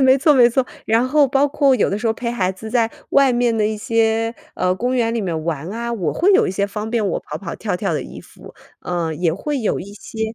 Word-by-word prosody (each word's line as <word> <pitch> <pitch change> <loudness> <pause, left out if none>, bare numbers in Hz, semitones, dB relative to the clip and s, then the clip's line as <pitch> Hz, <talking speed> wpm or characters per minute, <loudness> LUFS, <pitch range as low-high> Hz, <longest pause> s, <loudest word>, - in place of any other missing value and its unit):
没 265 0 +6
错， 300 +2 +4
没 245 -2 +6
错， 255 +1 0 0.2
然 230 +3 +2
后 295 0 +4
包 275 +2 +3
括 280 -2 +3
有 - - +1
的 200 - -1
时 230 - -3
候 225 - +3
陪 235 +1 -4
孩 190 -6 0
子 220 +4 -9
在 230 -2 +2 0.2
外 275 -2 +4
面 240 -1 +1
的 210 -1 +2
一 215 - -2
些， 225 +1 0 0.2
呃， 180 0 +1
公 250 +5 -1
园 230 -2 +1
里 230 - -1
面 165 -5 -3
玩 160 0 -3
啊， 235 +2 -4
我 175 -10 -1
会 390 +5 +3
有 385 - +4
一 - - -1
些 200 +2 -1
方 210 +2 -5
便 225 -4 0
我 185 - -1
跑 150 - -7
跑 170 -1 -6
跳 205 -5 -3
跳 190 -2 -2
的 150 - -1
衣 - - -10
服。 - - -15 0.3
呃， 170 -3 -2
也 165 0 0
会 285 - -3
有 215 - -1
一 200 +2 -9
些， 220 +2 -5
225 Hz, 285 characters per minute, -20 LUFS, 190-245 Hz, 0.3 s, 没